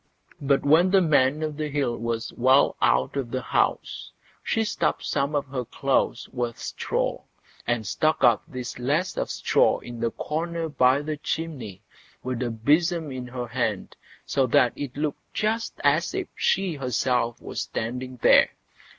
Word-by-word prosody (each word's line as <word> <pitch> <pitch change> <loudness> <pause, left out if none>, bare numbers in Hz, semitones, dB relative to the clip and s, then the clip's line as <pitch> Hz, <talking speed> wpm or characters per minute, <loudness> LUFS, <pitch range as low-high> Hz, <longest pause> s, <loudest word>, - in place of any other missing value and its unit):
But 140 -1 +2
when 160 +6 +5
the 195 +1 +5
Man 150 -3 +3
o' 155 - -1
the 150 +1 -4
Hill 140 -5 0
was 115 0 -3
well 130 +3 +4
out 65 - +2
of 135 -4 -2
the 130 +1 -3
house, - - -1 0.3
she 225 - 0
stuffed 215 - -1
some 140 +2 0
of 145 - 0
her 130 -2 -3
clothes 130 0 0
with 120 -2 -3
straw, - - -2 0.5
and 120 -2 0
stuck 155 +10 0
up 120 -3 +5
this 125 -1 -6
lass 150 +9 0
of - - -2
straw - - +2
in 120 -1 -9
the 115 - 0
corner 165 +5 -3
by 130 0 +3
the 155 0 -3
chimney, 135 - -5 0.4
with 125 -1 -3
a 125 - 0
besom 155 +7 +1
in 130 -1 -6
her 125 0 -5
hand, 115 -4 -2 0.3
so 135 -2 +1
that 120 0 +4
it 140 -2 -6
looked 150 -1 -4
just 225 +2 -1
as 145 +4 +2
if - - -3
she 190 -3 +1
herself 125 -2 0
were - - -9
standing 125 +3 -4
there. - - +6
130 Hz, 165 wpm, -25 LUFS, 120-155 Hz, 0.5 s, there